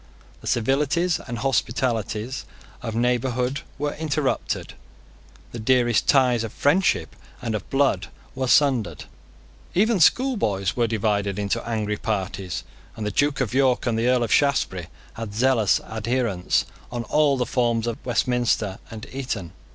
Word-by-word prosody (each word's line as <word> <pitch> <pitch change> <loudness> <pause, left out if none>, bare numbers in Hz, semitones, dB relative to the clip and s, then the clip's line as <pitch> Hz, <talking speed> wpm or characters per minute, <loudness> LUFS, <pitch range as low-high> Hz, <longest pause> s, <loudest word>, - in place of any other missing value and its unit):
The - - -10
civilities 145 +8 +1
and 120 - -4
hospitalities 120 -1 -1 0.4
of 115 -2 -4
neighbourhood 125 +2 0 0.2
were 145 +1 -2
interrupted. 150 -3 -2 0.8
The 120 - -6
dearest 120 0 +2
ties 125 -4 +4
of 115 - -4
friendship 170 +11 +1 0.2
and 115 -3 -3
of 105 -3 -4
blood 135 0 +2 0.3
were 130 0 -2
sundered. 120 - +2 0.7
Even 215 +2 +3
schoolboys 165 - +2
were 120 -2 +2
divided 105 -3 0
into 105 +3 -1
angry 105 -2 -1
parties; 95 -5 -3 0.3
and 110 - -5
the 105 - -1
Duke 145 +6 +1
of 120 -3 -1
York 130 -2 +2
and 120 -3 +1
the 115 +2 +1
Earl 125 -1 +3
of 115 - 0
Shaftesbury 125 - +1 0.3
had 110 -2 -6
zealous 115 -4 +3
adherents 110 -4 0 0.3
on 120 -1 -3
all 145 +4 +2
the 125 - 0
forms 120 -2 +1
of 115 -1 -4
Westminster 120 -4 0
and 110 0 -8
Eton. 125 -10 -4
120 Hz, 140 wpm, -24 LUFS, 110-135 Hz, 0.8 s, ties